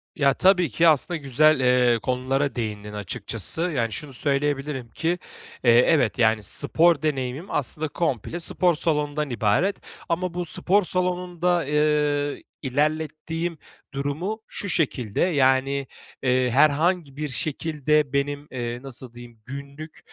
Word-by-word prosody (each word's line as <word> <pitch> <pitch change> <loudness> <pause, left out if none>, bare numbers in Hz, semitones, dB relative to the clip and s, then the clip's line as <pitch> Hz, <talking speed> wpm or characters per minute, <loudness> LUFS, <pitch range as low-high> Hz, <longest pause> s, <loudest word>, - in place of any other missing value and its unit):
Ya, 140 -1 +3
tabii 180 -4 +3
ki 165 +10 +3
aslında 160 +3 +3
güzel, 145 +1 +3 0.3
ııı, 115 - +2
konulara 135 +3 -1
değindin 105 -3 -4
açıkçası. 105 - -1
Yani, 130 -11 0
şunu 145 +2 -7
söyleyebilirim 140 -2 -1
ki, 175 +6 -1 0.4
eee, 120 - +6 0.2
evet, 135 -9 +2
yani, 110 -2 +3
spor 160 +4 +2
deneyimim 135 +1 -2
aslında 150 +3 -1
komple 150 - -2
spor 175 0 +1
salonundan 150 -2 -1
ibaret. 120 - +1 0.3
Ama 175 +1 -1
bu 175 0 -3
spor 195 +5 +1
salonunda, 180 -1 0
ııı, 150 -1 +1 0.2
ilerlettiğim 155 +4 -2 0.4
durumu 155 +11 -3
şu 200 - -6
şekilde, 125 - -1
yani, 135 -4 +2 0.4
ııı, 125 0 +2
herhangi 150 +2 +2
bir 150 -1 -3
şekilde 150 +1 0
benim, 145 +1 -1
eee, 120 -1 -4
nasıl 130 -2 -7
diyeyim, 120 -2 -13
günlük 140 +4 -9
145 Hz, 125 wpm, -24 LUFS, 130-165 Hz, 0.4 s, eee